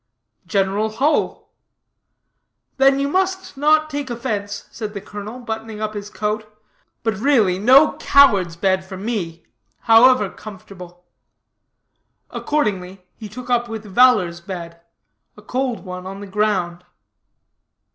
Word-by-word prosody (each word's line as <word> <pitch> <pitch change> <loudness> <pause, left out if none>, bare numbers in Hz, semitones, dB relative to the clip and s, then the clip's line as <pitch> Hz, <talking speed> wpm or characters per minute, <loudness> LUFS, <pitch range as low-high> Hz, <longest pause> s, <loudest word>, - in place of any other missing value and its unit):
"General 200 +3 0
Hull." 280 +7 0 1.3
"Then 270 0 +4
you 280 - 0
must 375 +3 -1
not 310 +2 +3
take 285 -3 -5
offense," 215 -5 -4
said 215 -2 -6
the - - -3
colonel, 205 +4 -8
buttoning 220 -2 -6
up 215 0 -3
his 205 -1 -7
coat, 215 0 -3 0.5
"but, 225 -1 0
really, 220 -8 +2
no 265 +8 +6
coward's 200 -12 +4
bed, 190 +1 +1
for 190 0 -9
me, 185 -6 -4 0.4
however 230 -1 +5
comfortable." 180 -3 -12 1.3
Accordingly 195 -10 -2
he 215 -2 -9
took 250 +4 -8
up 240 -1 +1
with 220 -1 -6
valor's 200 -6 +3
bed 170 -2 -8 0.6
a - - -14
cold 255 -4 -3
one 180 0 -7
on 195 +1 -7
the 205 - -8
ground. 190 -4 -1
215 Hz, 125 wpm, -20 LUFS, 190-250 Hz, 1.3 s, no